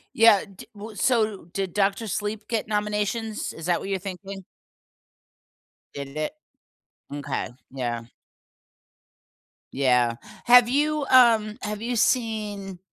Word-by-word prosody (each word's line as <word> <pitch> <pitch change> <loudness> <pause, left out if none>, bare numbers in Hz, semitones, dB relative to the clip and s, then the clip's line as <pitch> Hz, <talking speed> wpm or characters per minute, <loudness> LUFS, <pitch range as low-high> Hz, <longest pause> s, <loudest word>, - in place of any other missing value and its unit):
Yeah, 225 -3 +6
d 195 -2 -13
w 210 +1 -9
so, 215 -8 +1
did 195 -2 -3
Doctor 205 +2 +1
Sleep 210 +2 -3
get 225 -2 -2
nominations? 210 +1 -2
Is 160 - -9
that 175 - +2
what 195 - -6
you're 195 -1 -1
thinking? 195 0 -7 1.5
Did 140 0 -7
it? 155 - -2 0.8
M'kay, 145 -1 -3 0.2
yeah. 120 -3 -3 1.7
Yeah. 125 -3 +2 0.3
Have 245 0 +7
you, 295 +1 +1
um 230 -4 +5
have 210 0 -4
you 240 +1 -2
seen, 215 -6 -1
210 Hz, 115 wpm, -25 LUFS, 185-225 Hz, 1.7 s, Have